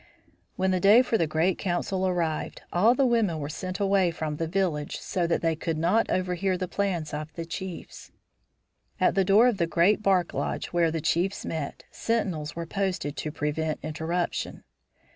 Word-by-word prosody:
When 190 0 +1
the 185 - +1
day 210 +7 +7
for 240 - -1
the 165 - +2
great 160 +4 +1
council 185 +1 -1
arrived, 170 -4 -2
all 220 +8 +4
the 270 - +3
women 225 -9 +2
were 145 -1 -4
sent 185 +4 -5
away 195 -2 +3
from 155 -3 -4
the 165 - -2
village 165 -5 -1
so 175 -2 -1
that 170 - 0
they 165 -1 +2
could 160 0 -3
not 180 +8 +2
overhear 185 +1 0
the 185 0 -3
plans 180 -6 -2
of 150 +1 -4
the 165 - -4
chiefs. 180 +1 -7 0.9
At - - +3
the 195 - +3
door 205 +6 +5
of 240 -5 +1
the 170 -2 +1
great 180 +6 +3
bark 190 -4 +2
lodge - - -3
where 170 -1 +3
the 160 0 -2
chiefs 180 +6 0
met, 155 -4 -4
sentinels 185 -10 -2
were 170 0 -4
posted 180 -5 -2
to 155 - -3
prevent 150 +1 -2
interruption. 160 +3 -3
175 Hz, 180 wpm, -27 LUFS, 160-195 Hz, 0.9 s, day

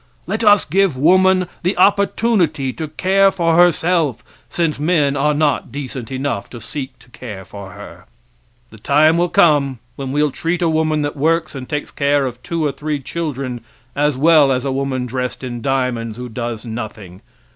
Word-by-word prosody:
Let 215 +5 -2
us 205 -2 +5
give 190 -3 +1
woman 185 +4 +4
the 180 +3 -1
opportunity 190 - +2
to 160 - -5
care 195 +5 +3
for 170 -4 +1
herself, 170 -5 +2 0.3
since 165 -4 -1
men 150 -3 +1
are 150 +2 +1
not 145 -4 0
decent 135 -2 -6
enough 130 -5 -3
to 120 - -9
seek 135 +4 -7
to - - -21
care 105 -7 -9
for 100 -1 -10
her. - - -12 0.7
The 110 - -14
time 150 +7 +4
will 175 +1 +1
come 145 -7 +3 0.2
when 135 -1 -4
we'll 150 +1 +1
treat 170 +5 -2
a 165 - +2
woman 155 -1 +1
that 145 - -3
works 160 +3 0
and 130 -3 -8
takes 150 -1 -3
care 140 0 +1
of 125 -1 -6
two 165 +4 -2
or 145 - +1
three 150 +2 -3
children 135 -5 -4 0.3
as 145 -1 +1
well 150 -1 +5
as 130 0 -1
a 135 - -1
woman 130 -1 -2
dressed 125 +1 -4
in 120 -2 -5
diamonds 125 -4 -1
who 125 0 -6
does 120 0 -5
nothing. 110 -5 -7
145 Hz, 180 wpm, -18 LUFS, 130-165 Hz, 0.7 s, us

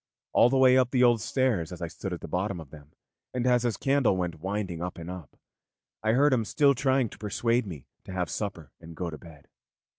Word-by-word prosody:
All 120 - +6
the 135 - +2
way 130 0 +6
up 125 -2 +2
the 125 -1 +2
old 120 -3 +4
stairs 110 - 0
as 90 - -7
I 85 - -3
stood 95 +4 -6
at 90 - -5
the - - -7
bottom 95 0 -2
of 75 -4 -11
them, 75 -1 -14 0.4
and 125 -1 -1
as 125 -1 +4
his 120 -2 -1
candle 135 -8 +2
went 90 -3 -3
winding 95 -2 -3
up 90 +1 -4
and 85 +1 -7
up, 90 -7 -10 0.6
I 110 0 +2
heard 140 +3 +4
him 120 -3 +2
still 140 +5 +3
trying 130 -1 +1
to - - -14
persuade 115 +2 0
me 75 -8 -8 0.2
to - - -8
have 90 -2 -1
supper 85 -9 -5
and 85 0 -11
go 85 0 -4
to 80 - -8
bed. 80 -4 -15
100 Hz, 235 wpm, -28 LUFS, 85-125 Hz, 0.6 s, All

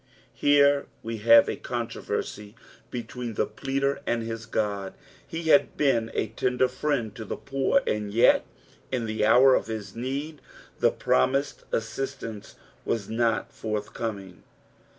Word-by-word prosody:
Here 145 0 +4 0.2
we 115 0 -4
have 115 +2 +7
a - - -2
controversy 115 -3 -4 0.3
between 120 -1 -5
the - - +1
pleader 140 +1 -2
and 120 -1 0
his 115 0 -6
God, 100 -4 -2 0.3
He 165 +1 -5
had 145 -2 +4
been 115 -6 +2
a 110 - 0
tender 125 +3 +1
friend 125 -4 -2
to 110 - -7
the 105 - -5
poor, 140 - +1
and 105 -1 -2
yet 115 +3 +5 0.5
in 125 -3 -1
the 110 -1 -2
hour 125 +4 +6
uf - - -1
his 110 -2 -6
need 140 +6 -4 0.4
the - - +5
promised 135 - 0
assist 130 +5 -3
ance 110 -3 -8 0.3
was 110 -4 -2
nut 115 -2 0
furthcoming. 105 -3 -5
115 Hz, 140 wpm, -26 LUFS, 110-135 Hz, 0.5 s, have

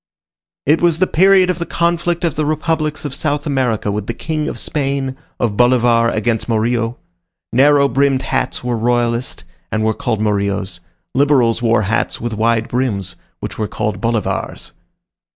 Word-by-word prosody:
It 155 +3 +3
was 170 -2 +3
the 185 - +3
period 185 +1 +4
of 180 - -5
the 170 - -2
conflict 170 +1 0
of 165 -4 +1
the 155 - -1
republics 155 0 -1
of 145 - -4
South 145 0 -1
America 125 -8 0
with 105 0 -3
the 115 - -3
King 155 -1 -3
of - - -4
Spain, 135 -2 -2 0.2
of 115 -4 0
Bolivar 120 -1 +4
against 115 +1 -1
Morillo. 115 +1 0 0.6
Narrow 140 +2 +5
brimmed 135 +1 +1
hats 135 - -1
were 125 -1 -1
royalist, 120 -1 0 0.3
and 110 0 0
were 110 0 +2
called 110 0 -2
morillos; 100 -3 -1 0.3
liberals 130 -4 +3
wore 115 -2 +2
hats 105 +3 -1
with 120 -1 -3
wide 115 +1 +1
brims, 100 -8 -2 0.3
which - - -6
were 105 - 0
called 105 -2 -3
bolivars. 115 -3 -2
125 Hz, 160 wpm, -17 LUFS, 110-145 Hz, 0.6 s, Narrow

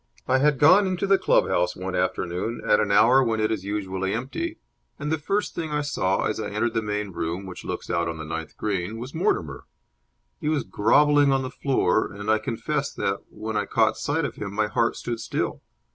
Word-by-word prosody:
I 130 +1 +3
had 145 0 +3
gone 185 +9 +6
into 185 +1 -1
the 195 0 +4
club - - +3
house 90 0 +1
one 95 0 -5
afternoon 90 +7 -1
at 105 - +5
an 100 - +1
hour 125 +6 +6
when 115 -2 0
it 110 0 +1
is 105 -4 -2
usually 95 -1 -2
empty, 320 - -4 0.4
and 150 +1 -3
the 160 - 0
first 200 +7 -1
thing 160 -2 -4
I 150 0 0
saw, 95 -9 0
as - - -1
I 105 - -3
entered 110 +3 -1
the 115 - +1
main 105 -1 -3
room, 85 +2 -3
which 90 -1 -8
looks - - -5
out 85 0 0
on 80 -1 -4
the 80 - -6
ninth 80 0 -6
green, 100 0 -2
was 125 +4 -7
Mortimer. 80 - -1 0.7
He 150 - -1
was 155 -3 +1
grovelling 145 +6 +4
on 135 0 +2
the 130 - -5
floor, 125 -7 +1
and 105 +2 -2
I 110 - +3
confess 115 +1 -2
that, - - -2
when 110 0 -6
I 105 -1 +1
caught 110 -1 +2
sight 145 +2 -1
of 140 - -5
him, 100 -2 -5
my 110 0 +2
heart 115 +2 0
stood 120 -1 -4
still. - - -3
110 Hz, 220 wpm, -25 LUFS, 100-140 Hz, 0.7 s, gone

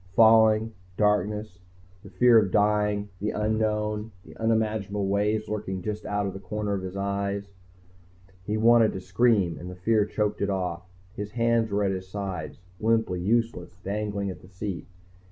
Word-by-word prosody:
Falling, 110 0 +5 0.2
darkness, 105 -1 0 0.4
the - - -12
fear 120 -2 +6
of 100 -3 +1
dying, 105 0 +1
the 105 - -1
unknown, 105 0 -1
the 80 -1 -13
unimaginable 110 -2 0
always 105 +2 0
lurking 95 -3 -4
just 105 0 -4
out 105 0 -1
of 95 - -3
the 95 - -7
corner 105 +2 -3
of 100 - -2
his 95 +1 -6
eye. 100 0 -2 1.0
He 105 +3 -2
wanted 115 0 +5
to - - -4
scream 95 -2 +2
and 90 - -7
the 90 - -8
fear 105 +3 +2
choked 105 -1 -1
it 100 - +1
off. 90 -2 -3 0.2
His 105 0 -6
hands 115 -1 +2
were 100 0 0
at 100 - +1
his 95 -1 -4
sides, 95 -4 -5 0.2
limply 110 -5 +1
useless, 110 -3 -1
dangling 100 -1 -2
at - - -11
the - - -15
seat. 95 -2 -6
105 Hz, 165 wpm, -26 LUFS, 95-110 Hz, 1.0 s, fear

